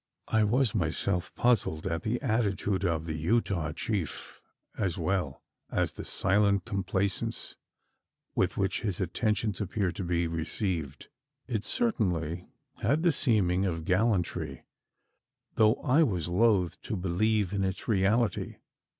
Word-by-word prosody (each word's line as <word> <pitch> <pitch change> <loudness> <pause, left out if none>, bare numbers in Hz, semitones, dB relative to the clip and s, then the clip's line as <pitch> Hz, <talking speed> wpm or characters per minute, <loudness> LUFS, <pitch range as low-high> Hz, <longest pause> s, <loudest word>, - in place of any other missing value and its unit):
I 110 -1 +3
was 120 +2 +2
myself 90 0 -1
puzzled 110 -10 +2
at 80 0 -1
the 115 +3 -1
attitude 105 -5 0
of 80 -3 0
the 80 - -3
Utah 85 -1 0
chief 95 +1 -4 0.3
as 95 -4 -1
well 90 +2 -1 0.3
as - - 0
the - - -7
silent 100 -1 +2
complaisance 100 -2 -1 0.8
with - - 0
which 95 -1 0
his 100 -6 -2
attentions 105 +2 0
appeared 100 -2 -1
to 95 - -2
be 85 -1 0
received. 80 - -3 0.4
It 110 -5 -2
certainly 90 - -1 0.3
had 145 +9 +2
the 175 - +5
seeming 100 - +3
of 80 -3 -3
gallantry 90 - 0 0.9
though 110 +1 +4
I 145 +3 +4
was 90 - +1
loth 95 -2 +2
to 110 - -4
believe 100 +2 +1
in 100 -1 0
its 95 0 -3
reality. 110 +2 +1
95 Hz, 130 wpm, -29 LUFS, 85-110 Hz, 0.9 s, the